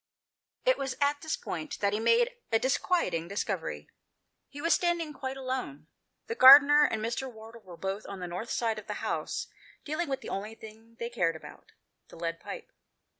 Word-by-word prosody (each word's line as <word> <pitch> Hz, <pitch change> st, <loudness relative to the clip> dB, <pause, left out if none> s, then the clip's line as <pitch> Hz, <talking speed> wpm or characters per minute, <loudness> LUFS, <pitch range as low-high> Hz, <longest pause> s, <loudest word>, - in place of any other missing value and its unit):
It -, -, +3 dB
was 270 Hz, -1 st, -3 dB
at 285 Hz, 0 st, +1 dB
this 315 Hz, -, -2 dB
point 310 Hz, -, -5 dB
that 200 Hz, 0 st, +1 dB
he 210 Hz, -, 0 dB
made 470 Hz, -, +3 dB, 0.2 s
a 225 Hz, -, +5 dB
disquiet 260 Hz, -, +1 dB
ing 165 Hz, 0 st, -2 dB
discovery. 200 Hz, +3 st, -3 dB, 0.6 s
He 285 Hz, -, -10 dB
was 335 Hz, +3 st, +3 dB
standing 340 Hz, -3 st, 0 dB
quite 265 Hz, -1 st, -5 dB
alone. 255 Hz, -, -4 dB, 0.4 s
The 460 Hz, -, -3 dB
gardener 290 Hz, -, +9 dB
and 220 Hz, -4 st, -1 dB
Mr. 250 Hz, +3 st, -3 dB
Wardle 225 Hz, +1 st, -13 dB
were 180 Hz, -4 st, -12 dB
both 195 Hz, +3 st, -4 dB
on 200 Hz, -1 st, -7 dB
the 180 Hz, -, -4 dB
north 180 Hz, +6 st, -5 dB
side 225 Hz, -2 st, -1 dB
of 210 Hz, -, -14 dB
the -, -, -4 dB
house, -, -, -2 dB, 0.4 s
dealing 310 Hz, +1 st, -2 dB
with 270 Hz, -, -2 dB
the -, -, -8 dB
only 210 Hz, +3 st, -4 dB
thing 225 Hz, +1 st, -14 dB
they 235 Hz, +1 st, -4 dB
cared 175 Hz, -8 st, +1 dB
about 160 Hz, -, -13 dB, 0.2 s
— -, -, -51 dB
the -, -, -13 dB
lead 165 Hz, 0 st, -4 dB
pipe. -, -, -8 dB
235 Hz, 195 wpm, -29 LUFS, 200-290 Hz, 0.6 s, gardener